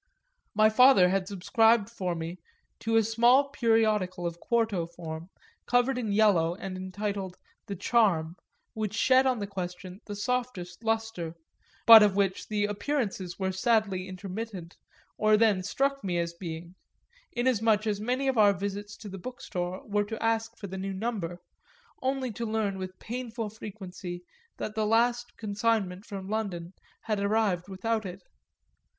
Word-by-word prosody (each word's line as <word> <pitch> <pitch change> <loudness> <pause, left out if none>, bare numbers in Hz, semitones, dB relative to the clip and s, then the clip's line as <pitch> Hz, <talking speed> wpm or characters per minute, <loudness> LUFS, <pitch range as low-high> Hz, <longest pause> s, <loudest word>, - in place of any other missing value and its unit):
My 215 +1 +5
father 250 -6 +7
had 190 0 0
subscribed 220 +3 +3
for 185 -7 -3
me 165 +2 -5 0.4
to 225 0 -1
a 225 - +5
small 240 +6 +4
periodical 215 -8 +1
of 170 0 -3
quarto 220 -7 0
form, 170 0 -8 0.4
covered 245 +2 +3
in 220 -4 -2
yellow 195 -6 +3
and 190 -1 -6
entitled 190 0 -4 0.3
The 200 - -4
Charm, 180 -7 +2 0.4
which 215 -1 -3
shed 260 +3 +4
on 255 -2 +2
the 205 - -3
question 185 0 -6
the 205 - -6
softest 210 -5 -3
lustre, 225 -7 -2 0.5
but 225 -1 +11
of 205 -2 +4
which 195 -2 0
the 210 -1 0
appearances 205 -4 -2
were 190 -1 -1
sadly 195 -2 +1
intermittent, 190 -1 -6 0.4
or 215 0 +5
then 210 -4 +3
struck 275 +8 -1
me 180 -3 -1
as 170 0 -1
being; 170 0 -7 0.6
inasmuch 225 -3 +2
as 210 -2 -1
many 255 +5 0
of 260 -4 +1
our 205 -1 +6
visits 200 +2 -5
to 215 - -10
the 195 -1 -7
Bookstore 185 -6 -5
were 205 0 0
to 220 +2 -5
ask 225 0 0
for 205 - -8
the 190 0 -6
new 195 +1 -3
number 190 -4 -3 0.6
only 260 -1 -1
to 230 +2 -4
learn 205 -3 -1
with 185 0 -6
painful 235 -2 -5
frequency 190 -4 -8 0.3
that 215 - -4
the 215 -1 0
last 240 +2 +1
consignment 205 -2 -1
from 195 -3 -6
London 195 -5 -3 0.3
had 215 -2 -1
arrived 200 -3 +1
without 220 +4 -1
it. 185 -1 -8
205 Hz, 155 wpm, -28 LUFS, 185-225 Hz, 0.6 s, but